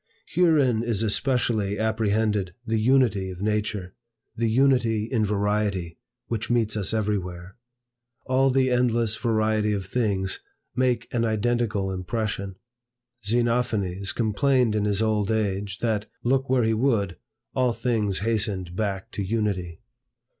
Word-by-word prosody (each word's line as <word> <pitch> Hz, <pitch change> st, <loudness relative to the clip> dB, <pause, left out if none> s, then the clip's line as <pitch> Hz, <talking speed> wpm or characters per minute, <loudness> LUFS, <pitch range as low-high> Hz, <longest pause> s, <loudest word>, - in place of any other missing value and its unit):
Herein 150 Hz, -10 st, +3 dB
is 115 Hz, -2 st, 0 dB
especially 110 Hz, -3 st, +1 dB
apprehended 110 Hz, -3 st, 0 dB
the 110 Hz, 0 st, 0 dB
unity 110 Hz, -5 st, +3 dB
of 90 Hz, -1 st, -8 dB
Nature, 105 Hz, -3 st, -1 dB, 0.4 s
the 115 Hz, 0 st, 0 dB
unity 120 Hz, -3 st, +3 dB
in 115 Hz, -1 st, 0 dB
variety, 105 Hz, -4 st, -1 dB, 0.3 s
which 115 Hz, -1 st, -3 dB
meets 115 Hz, -3 st, +1 dB
us 100 Hz, -3 st, 0 dB
everywhere. 95 Hz, -4 st, -2 dB, 0.7 s
All 130 Hz, +1 st, +3 dB
the 130 Hz, 0 st, +2 dB
endless 120 Hz, -3 st, +2 dB
variety 110 Hz, -1 st, +1 dB
of 100 Hz, -2 st, -3 dB
things 95 Hz, -3 st, -1 dB, 0.4 s
make 125 Hz, -1 st, +1 dB
an 120 Hz, -1 st, +1 dB
identical 110 Hz, -3 st, 0 dB
impression. 100 Hz, +1 st, -3 dB, 0.7 s
Xenophanes 110 Hz, -4 st, 0 dB
complained 120 Hz, +1 st, +2 dB
in 105 Hz, -1 st, +1 dB
his 105 Hz, +1 st, +1 dB
old 105 Hz, -2 st, +1 dB
age, 100 Hz, -2 st, -1 dB
that, 110 Hz, -2 st, 0 dB, 0.2 s
look 135 Hz, +2 st, +1 dB
where 130 Hz, -2 st, +3 dB
he 110 Hz, 0 st, +2 dB
would, 110 Hz, -6 st, +1 dB, 0.4 s
all 125 Hz, -2 st, +2 dB
things 110 Hz, -5 st, -1 dB
hastened 100 Hz, -5 st, -1 dB
back 100 Hz, -2 st, -3 dB
to -, -, -4 dB
Unity. 95 Hz, -5 st, -2 dB
110 Hz, 125 wpm, -25 LUFS, 100-120 Hz, 0.7 s, Herein